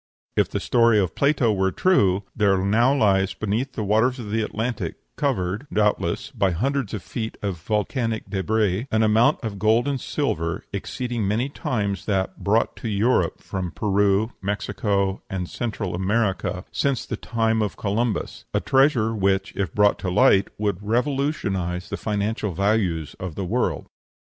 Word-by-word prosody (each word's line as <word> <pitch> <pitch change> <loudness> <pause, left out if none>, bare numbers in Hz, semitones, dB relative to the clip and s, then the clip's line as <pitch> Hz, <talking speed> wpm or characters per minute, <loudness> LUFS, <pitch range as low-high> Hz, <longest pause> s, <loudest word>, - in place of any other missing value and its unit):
If - - +2
the - - -2
story 115 -2 +4
of 95 -5 +1
Plato 140 -6 +2
is 95 - -2
true, 100 - +3
there 100 -3 +3
now 110 +7 +3
lies 100 -7 +2
beneath 110 +6 -2
the 110 - -3
waters 110 +6 +2
of 110 -5 -6
the 110 +1 +1
Atlantic, 110 +2 -3 0.2
covered, 110 -4 -1
doubtless, 105 0 0
by 100 - +1
hundreds 125 +5 -1
of 100 - -6
feet 110 -2 -5
of 100 -3 -2
volcanic 110 - -1
débris, 105 +3 0
an 110 0 +3
amount 110 +7 +4
of 105 -4 -4
gold 110 +5 +3
and 140 -3 -1
silver 85 - -2
exceeding 120 +2 -3
many 115 +7 0
times 100 -8 -2
that 95 -2 -1
brought 110 +3 +2
to - - -5
Europe 105 -4 +1
from 95 -2 -3
Peru, 100 +3 +1
Mexico, 100 0 -1
and 90 -2 -3
Central 105 -4 -3
America 95 -1 -1
since 140 -3 0
the - - -3
time 115 -1 0
of 105 -2 -2
Columbus; 110 +2 -2
a - - +4
treasure 135 -5 +3
which, 95 -2 0
if 95 -5 -1
brought 105 +2 +3
to 95 - -2
light, 100 0 +4
would 100 -3 -1
revolutionize 110 - -1
the - - -2
financial 105 -1 -2
values 95 -5 0
of 90 -4 -5
the 95 - -3
world. - - -1
105 Hz, 160 wpm, -23 LUFS, 95-115 Hz, 0.2 s, story